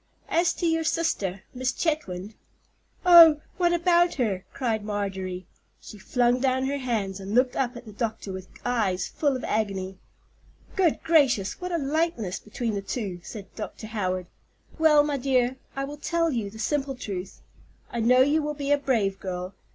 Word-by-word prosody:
As 340 +1 +3
to 350 - -2
your 325 -1 +2
sister, 205 - -1
Miss 255 0 -1
Chetwynd——" 215 - -2 0.7
"Oh, 335 -4 +9 0.2
what 350 -1 +3
about 345 0 +3
her?" 205 -8 -1
cried 225 -5 -1
Marjorie. 190 -3 -3 0.3
She 210 - -12
flung 245 +4 +2
down 260 0 +1
her 280 +1 -1
hands, 215 -7 -2
and 195 +2 -4
looked 250 0 +3
up 250 -2 -1
at 240 - -11
the 215 - -10
doctor 220 -2 -4
with 185 0 -7 0.2
eyes 200 -7 0
full 285 -3 0
of 255 - -5
agony. 195 -3 -2 0.8
"Good 355 -5 +2
gracious! 275 - +3
what 360 0 -4
a 340 - +1
likeness 280 - -1
between 225 +1 -4
the 200 - -2
two," 195 -4 -4
said 200 +1 -10
Dr. 220 0 -7
Howard. 185 -4 -2 0.5
"Well, 305 -2 +6
my 290 -1 -1
dear, 255 -1 +1 0.2
I 275 - -2
will 290 +2 -6
tell 335 +2 0
you 225 -6 -2
the 215 - -12
simple 275 +3 -1
truth. 195 -6 -6 0.5
I 235 - -3
know 250 +3 +5
you 290 +4 +3
will 300 0 -3
be 285 -1 -2
a 290 - +4
brave 215 -9 0
girl. 180 0 -5
245 Hz, 175 wpm, -26 LUFS, 200-295 Hz, 0.8 s, Oh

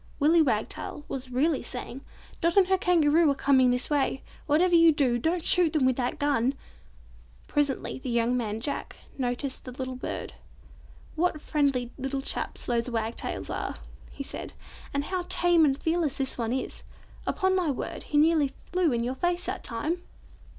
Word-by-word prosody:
Willy 320 +3 +5
Wagtail 270 +2 -2
was 260 -1 -4
really 275 +4 +1
saying, 250 +1 -5 0.4
"Dot 335 +3 +1
and 390 - +7
her 380 - +4
Kangaroo 330 -3 +4
are 280 - +2
coming 265 -2 +4
this 250 +1 +1
way. 280 -2 0 0.2
Whatever 340 +5 +3
you 335 -1 +7
do, 260 -5 +1
don't 335 +5 -1
shoot 350 -4 +4
them 300 -5 +2
with 260 -1 +3
that 250 -1 -1
gun." 275 -2 +1 0.9
Presently 285 -3 -1
the 260 - -5
young 235 +1 +1
man, 220 -3 -2
Jack, 285 +4 -4 0.2
noticed 255 +1 -2
the 255 - -8
little 260 0 -5
bird. 255 - -5 0.8
"What 330 -1 +1
friendly 275 -5 0
little 270 +1 -2
chaps - - -2
those 235 0 0
wagtails 225 -1 -3
are," - - -3 0.3
he 280 - -7
said, - - -6 0.4
"and 280 0 -1
see - - -8
how 365 -2 -1
tame 345 -2 +4
and 275 -2 +2
fearless 320 -4 0
this 270 -1 0
one 230 -2 -2
is. 260 +1 -3 0.5
Upon 375 -1 +1
my 360 -4 +1
word, 275 - -4
he 295 - -1
nearly 300 -3 +4 0.2
flew 360 -4 +2
in 235 -1 0
your 250 +2 -1
face 350 +6 0
that - - -3
time!" 310 +10 -2
280 Hz, 175 wpm, -27 LUFS, 255-330 Hz, 0.9 s, and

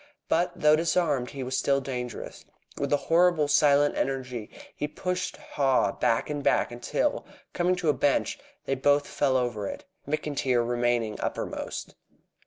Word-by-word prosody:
But, 175 +2 +2
though 150 0 +5
disarmed, 155 -5 +1
he 135 -2 -6
was 130 +1 -3
still 140 0 +2
dangerous. 125 -2 -6 0.4
With 140 - -2
a 145 - +4
horrible 165 0 +3
silent 145 0 +4
energy 125 -5 -3 0.3
he 150 - -2
pushed 180 +3 -3
Haw 135 -2 +1
back 115 - 0
and 145 -1 -3
back - - +2
until, 120 0 -1 0.3
coming 180 +1 +2
to 180 -3 -1
a - - +5
bench, 145 -1 +1 0.3
they - - 0
both 145 +2 +2
fell 135 -2 +1
over 120 -5 -2
it, - - -7 0.2
McIntyre 135 -5 0
remaining 120 -2 0
uppermost. - - -4
140 Hz, 150 wpm, -27 LUFS, 125-150 Hz, 0.4 s, though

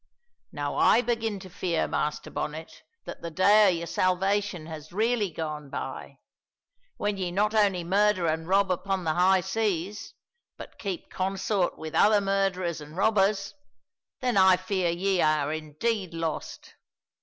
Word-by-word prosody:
"Now - - -4
I - - +5
begin 225 -3 -1
to 185 - -10
fear, 175 -2 -1
Master 150 0 -2
Bonnet, 155 +2 -6 0.2
that - - -8
the 170 - -5
day 205 +5 +5
o' - - +6
your 170 -2 -1
salvation 185 0 0
has 155 -1 -9
really 220 +1 +1
gone 150 -3 -5
by. - - -6 0.8
When 205 -1 -1
ye 185 -2 -2
not 210 +4 +1
only 200 -5 +2
murder 195 0 +2
an' 160 +1 -1
rob 195 0 +3
upon 190 +1 -1
the 160 -2 0
high 185 +2 +4
seas, 205 +1 -2 0.4
but - - -11
keep 195 -4 -5
consort 190 0 -1
with 160 -1 -7
other 210 0 +5
murderers 195 -4 -1
an' 150 +1 -11
robbers, 200 0 +1 0.7
then 250 -4 0
I 190 -1 +6
fear 185 -1 -1
ye 185 +2 0
are 155 -1 +2
indeed 165 +5 -3
lost. 165 -1 -5
185 Hz, 150 wpm, -27 LUFS, 165-205 Hz, 0.8 s, o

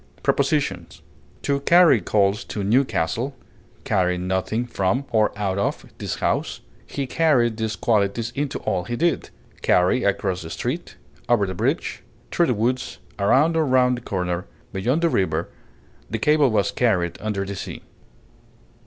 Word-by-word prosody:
Prepositions: - - 0 0.4
To 140 -1 +1
carry 165 - +5
coals 100 +1 +1
to 105 - -4
Newcastle; 120 +2 +1 0.5
carry 90 -1 +1
nothing 95 +6 -1
from, 120 +3 -1
or 110 -2 +3
out 100 -2 -1
of, 100 - -1
this - - -3
house; - - -1 0.3
he 140 - -3
carried 125 -7 +2
these 110 -1 -2
qualities 110 +1 0
into 145 -1 -2
all 95 -5 -1
he 120 - -3
did; 170 +6 0 0.3
carry 90 +8 +3
across 95 -2 0
the 80 - -8
street, - - -4 0.3
over 115 -4 +4
the 95 - -4
bridge, 90 - -1 0.3
through 170 - +2
the 125 - +1
woods, 125 +4 -1 0.2
around 140 +11 +3
or 160 - +3
round 130 -2 +3
the 120 - -7
corner; 90 -3 -3 0.3
beyond 125 - 0
the 170 - +4
river; 85 - 0 0.6
the 115 - -2
cable 150 +4 +3
was 105 -3 +1
carried 90 -8 0
under 105 -2 -2
the 100 +1 -5
sea. - - -7
110 Hz, 150 wpm, -23 LUFS, 95-130 Hz, 0.6 s, carry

